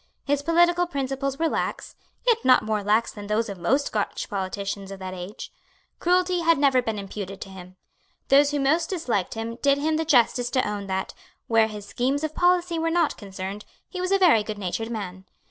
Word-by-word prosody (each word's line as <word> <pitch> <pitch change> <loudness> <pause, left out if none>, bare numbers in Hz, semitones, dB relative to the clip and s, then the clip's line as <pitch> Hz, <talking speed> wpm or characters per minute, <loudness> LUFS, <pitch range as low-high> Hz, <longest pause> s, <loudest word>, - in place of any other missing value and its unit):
His 285 0 +1
political 345 +3 +3
principles 275 -2 -2
were 330 - +1
lax, - - -3 0.3
yet 465 -2 +3
not 255 - +5
more 215 -1 -1
lax 215 +3 +2
than 205 -1 -9
those 215 +1 0
of 195 -2 -7
most 270 +12 +2
Scotch - - -3
politicians 195 0 -3
of 195 - -7
that 185 -1 -6
age. 185 +4 -8 0.5
Cruelty 360 +1 +2
had 330 -1 +3
never 270 -2 +4
been 225 -3 -3
imputed 195 -1 -6
to - - -7
him. 185 -1 -11 0.5
Those 280 +1 +6
who 290 0 -1
most 315 +5 +2
disliked 245 - -1
him 225 +1 -4
did 280 0 +4
him 310 +2 0
the 320 - 0
justice 245 -4 +3
to 255 -4 +1
own 205 -1 -4
that, 190 0 -3 0.3
where 225 -1 +3
his 210 -2 -8
schemes 265 +7 -1
of 310 -1 -2
policy 355 -1 +2
were 330 0 0
not 335 -2 +1
concerned, 195 0 -7 0.3
he 365 - -5
was 365 +1 -1
a 390 - +5
very 340 - +5
goodnatured 210 +1 -4
man. 190 -5 -6
245 Hz, 195 wpm, -25 LUFS, 205-315 Hz, 0.5 s, Those